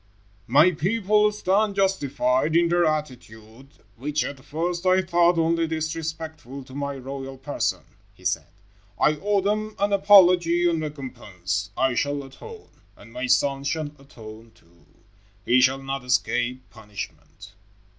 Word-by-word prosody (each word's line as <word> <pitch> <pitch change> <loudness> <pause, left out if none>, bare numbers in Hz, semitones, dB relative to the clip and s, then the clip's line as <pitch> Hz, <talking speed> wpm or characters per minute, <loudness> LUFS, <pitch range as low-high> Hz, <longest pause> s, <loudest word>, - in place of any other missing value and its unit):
"My 150 +9 +5
people 210 +5 +2
stand 205 0 0
justified 145 -7 +1
in 170 0 +4
their 175 0 +3
attitude 125 -5 -5 0.3
which 150 +5 -1
at 135 -2 -7
first 170 +4 -3
I 185 0 +3
thought 175 0 +3
only 165 0 +1
disrespectful 160 -3 -5
to 130 - -15
my 140 0 -4
royal 135 0 -7
person," 135 +2 -2 0.3
he - - -20
said. - - -1 0.5
"I 150 0 +3
owe 205 -1 +1
them 215 +2 -2
an 200 0 0
apology 180 -3 +5
and 165 -2 0
recompense. 105 - -5
I 130 -1 +2
shall 145 +2 -1
atone. 425 - -12 0.3
And 115 - -16
my 130 - -3
son 140 +2 +2
shall 145 +1 -2
atone, 115 -4 -13
too. 85 -5 -26 0.6
He 130 +1 +4
shall 130 +1 +3
not 135 -1 -4
escape 125 0 -1
punishment." 105 -2 -10
150 Hz, 135 wpm, -24 LUFS, 130-175 Hz, 0.6 s, My